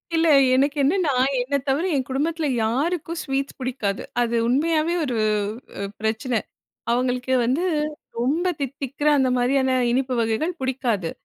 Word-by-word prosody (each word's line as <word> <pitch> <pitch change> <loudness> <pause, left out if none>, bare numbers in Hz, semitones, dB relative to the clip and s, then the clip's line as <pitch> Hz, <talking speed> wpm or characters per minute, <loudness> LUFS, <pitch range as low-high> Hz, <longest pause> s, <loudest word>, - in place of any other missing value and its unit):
இல்ல. 325 0 +3 0.3
எனக்கு 280 +3 +2
என்னன்னா, 320 0 +2 0.3
என்னத் 275 +2 -2
தவிர 275 +5 +1
என் 260 -2 -1
குடும்பத்தில 315 +4 -1 0.2
யாருக்கும் 325 +8 -1
ஸ்வீட்ஸ் 275 0 -3
பிடிக்காது. 225 -6 -2 0.2
அது 235 0 0
உண்மையாவே 315 +6 +1
ஒரு 245 -4 -2 0.6
அ 200 - -2 0.2
பிரச்சன. 220 +2 0 0.5
அவுங்களுக்கு 250 +1 0
வந்து 265 +10 +1 0.5
ரொம்ப 300 +9 +1
தித்திக்கிற 280 +2 -2
அந்த 260 -1 +3
மாரியான 260 +1 +2 0.2
இனிப்பு 255 +1 0
வகைகள் 230 +10 0
பிடிக்காது. 245 -9 -1
265 Hz, 130 wpm, -23 LUFS, 245-300 Hz, 0.6 s, இல்ல